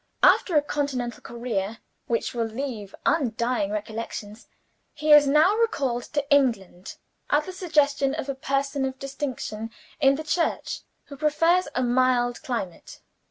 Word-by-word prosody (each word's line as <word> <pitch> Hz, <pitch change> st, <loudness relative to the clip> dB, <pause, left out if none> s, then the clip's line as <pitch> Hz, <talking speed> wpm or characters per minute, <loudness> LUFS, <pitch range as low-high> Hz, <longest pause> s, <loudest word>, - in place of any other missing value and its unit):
After 350 Hz, -, +5 dB
a 290 Hz, -, +4 dB
continental 275 Hz, -5 st, -3 dB
career, 230 Hz, -3 st, -3 dB, 0.3 s
which 230 Hz, -, -1 dB
will 230 Hz, -2 st, -1 dB
leave 225 Hz, -4 st, -5 dB
undying 240 Hz, -7 st, +1 dB
recollections, 215 Hz, +1 st, -6 dB, 0.5 s
he 305 Hz, 0 st, 0 dB
is 295 Hz, -1 st, +8 dB
now 305 Hz, +8 st, +5 dB
recalled 275 Hz, -, 0 dB
to 290 Hz, -2 st, -1 dB
England 215 Hz, -10 st, 0 dB, 0.3 s
at 295 Hz, +1 st, +2 dB
the 370 Hz, -, -7 dB
suggestion 295 Hz, -6 st, +1 dB
of -, -, -4 dB
a 275 Hz, -, -1 dB
person 275 Hz, +1 st, -1 dB
of 265 Hz, 0 st, -2 dB
distinction 265 Hz, -5 st, -5 dB, 0.3 s
in 275 Hz, -2 st, +5 dB
the 310 Hz, -, -5 dB
Church, 335 Hz, +2 st, -1 dB, 0.2 s
who 285 Hz, -, -10 dB
prefers 330 Hz, +5 st, +2 dB
a 255 Hz, -, +1 dB
mild 245 Hz, -1 st, +2 dB
climate. 225 Hz, -9 st, -5 dB
265 Hz, 140 wpm, -25 LUFS, 235-290 Hz, 0.5 s, is